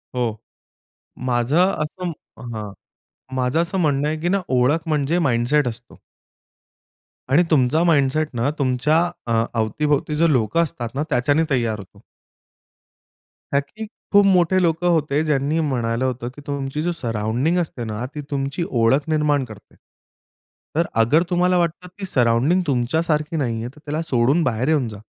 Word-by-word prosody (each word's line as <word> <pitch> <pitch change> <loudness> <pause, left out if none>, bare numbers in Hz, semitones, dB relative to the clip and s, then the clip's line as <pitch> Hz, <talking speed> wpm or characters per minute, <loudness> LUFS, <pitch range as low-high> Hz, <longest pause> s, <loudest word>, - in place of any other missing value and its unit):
हो. 115 -3 -1 0.9
माझं 120 +4 +1 0.3
असं 175 +4 -4 0.4
हां, 105 -2 -6 0.6
माझं 130 +5 +1
असं 170 +3 -2
म्हणणं 145 -4 +1
आहे, 155 +1 -2
की 170 +3 -1
ना 195 +1 +1
ओळख 140 +6 +2
म्हणजे 155 +2 +1
माइंडसेट 130 0 +2
असतो. 120 +1 -7 1.3
आणि 160 +6 +5
तुमचा 155 +2 +3
माइंडसेट 155 -2 +2
ना, 120 +3 0
तुमच्या 140 +4 +2 0.3
अ, 115 -1 +2
अवती-भोवती 145 +7 0
जे 165 +1 +3
लोकं 135 +6 +2
असतात 120 -6 -5
ना, 145 - 0
त्याच्याने 145 +6 +2
तैयार 115 -6 0
होतो. 95 - -14 1.5
कारण 140 - +4 0.2
की 220 - -4 0.3
खूप 205 0 +7
मोठे 185 -1 +3
लोकं 170 0 +1
होते, 155 -3 +1
ज्यांनी 150 +1 +1
म्हणालं 125 -5 -1
होतं, 125 -2 -3
की 145 - -11
तुमची 140 +1 -3
जी 175 +2 0
सराऊंडिंग 120 +4 -1
असते 155 -8 -3
ना, 110 +1 -4
ती 150 - -4
तुमची 140 +3 -2
ओळख 125 +4 +2
निर्माण 150 -3 +2
करते. 110 -4 -14 1.0
तर 170 +2 +2 0.2
अगर 150 +9 +3
तुम्हाला 180 0 +2
वाटतं 175 +1 -1
ती 195 - -4
सराऊंडिंग 130 +3 +2
तुमच्यासारखी 150 +4 0
नाहीये, 115 -4 -2
तर 145 - -17
त्याला 150 +2 -2
सोडून 130 +7 +2
बाहेर 125 -1 0
येऊन 150 -6 +2
जा. 105 - -9
145 Hz, 150 wpm, -21 LUFS, 120-160 Hz, 1.5 s, खूप